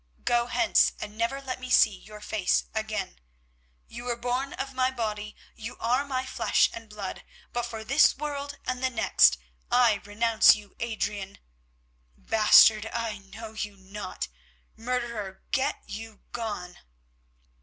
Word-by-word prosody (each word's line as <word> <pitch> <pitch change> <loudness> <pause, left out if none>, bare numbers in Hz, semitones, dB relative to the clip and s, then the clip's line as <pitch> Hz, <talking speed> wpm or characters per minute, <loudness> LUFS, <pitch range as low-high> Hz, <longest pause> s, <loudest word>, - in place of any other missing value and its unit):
"Go 240 0 +2
hence 330 +8 +3
and 210 0 -7
never 230 +5 -1
let 260 -2 -5
me 255 0 -7
see 215 -4 +5
your 210 +2 -13
face 210 -3 +1
again. 220 - -3 0.7
You 240 +1 -9
were 245 -1 -1
born 250 +3 -2
of 270 0 -5
my 255 0 +2
body, 215 -4 -4 0.2
you 225 +2 -8
are 250 +4 +1
my 260 -2 -2
flesh - - +2
and 225 -1 -9
blood, 205 -2 -6 0.3
but 240 0 -1
for 225 -2 -7
this 275 +7 +4
world 285 -1 -4
and 255 0 -2
the 260 - +3
next 235 -3 +4 0.3
I 240 -4 +4
renounce 220 +2 +5
you, 205 -1 -13
Adrian. 210 -4 -3 0.8
Bastard, 215 0 +6
I 225 -3 -3
know 220 +3 -10
you 210 -2 -5
not. 195 +2 -6 0.5
Murderer, 230 -5 -4
get 265 - 0
you 220 0 -8
gone." 205 -6 -5
225 Hz, 145 wpm, -27 LUFS, 210-250 Hz, 0.8 s, Bastard